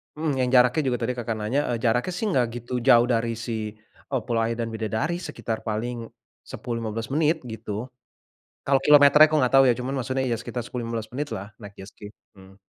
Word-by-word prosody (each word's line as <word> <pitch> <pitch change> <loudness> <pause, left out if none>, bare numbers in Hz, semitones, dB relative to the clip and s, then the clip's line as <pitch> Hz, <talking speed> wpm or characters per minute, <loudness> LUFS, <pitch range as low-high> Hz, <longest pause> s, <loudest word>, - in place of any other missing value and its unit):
mhm, 150 -4 -2
yang 125 -1 +1
jaraknya 125 +5 +5
juga 125 -1 +1
tadi 125 - 0
Kakak 120 -2 -4
nanya, 110 +7 -1
eee, - - -2
jaraknya 125 - 0
nggak 125 -5 +2
begitu 120 +1 -8
jauh 120 -1 +5
dari 115 -1 0
si, 110 -2 -5
eee, 110 +1 -29 0.2
Kepulauan 115 -1 -1
Bidadari, 110 +10 -2
sekitar 115 -9 -5
paling 115 +2 -3 0.4
10, 120 -1 -5
15 115 +2 -5
menit 155 0 +1
gitu. 110 +1 -6 0.7
Kalau 135 0 +2
kilometernya 150 +1 +8
aku 155 0 0
tidak 125 - +1
tahu 135 0 +7
ya, 120 - +5
cuman 125 +3 -4
maksudnya 130 +1 -2
ya 115 - 0
sekitar 120 +1 -5
10, 120 -1 -5
15 115 -1 -5
menit 145 +3 -3
lah 100 +2 -8
naik 100 -2 -11
jet 95 +1 -10
ski. 105 - -11 0.3
Mmm. 95 0 -16
120 Hz, 195 wpm, -24 LUFS, 110-130 Hz, 0.7 s, kilometernya